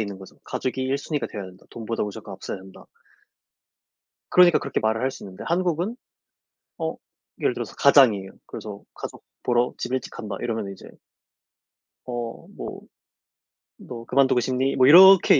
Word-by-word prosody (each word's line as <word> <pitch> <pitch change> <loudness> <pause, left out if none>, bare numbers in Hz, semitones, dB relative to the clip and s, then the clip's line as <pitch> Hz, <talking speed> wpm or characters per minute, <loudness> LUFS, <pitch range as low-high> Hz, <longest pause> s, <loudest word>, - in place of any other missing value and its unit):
있는 100 -3 -4
거죠. 95 - -14
'가족이 130 0 -3
1 135 +2 0
순위가 150 -4 -3
되어야 100 -2 -7
된다. 90 0 -15
돈보다 115 0 -4
무조건 105 -1 -6
앞서야 95 - -6
한다.' 95 0 -14 1.5
그러니까 180 -2 +6
그렇게 - - -2
말을 110 +1 0
할 130 +1 0
수 - - -11
있는데 95 0 -9
한국은 175 +4 0 0.8
어 - - -3 0.4
예를 - - +1
들어서 - - -6
가장이에요. 105 -9 +5
그래서 - - -8
"가족 - - -8 0.2
보러 120 0 +1
집에 130 - -1
일찍 - - -5
간다." 105 -3 -6
이러면 110 -4 -3
이제 95 - -13 1.2
어 120 -2 -5
뭐 - - -7 1.0
"너 115 -2 -9
그만두고 135 -1 +3
싶니?" 130 +2 0
뭐 130 0 +5
이렇게 185 0 +9
120 Hz, 330 characters per minute, -24 LUFS, 105-135 Hz, 1.5 s, 이렇게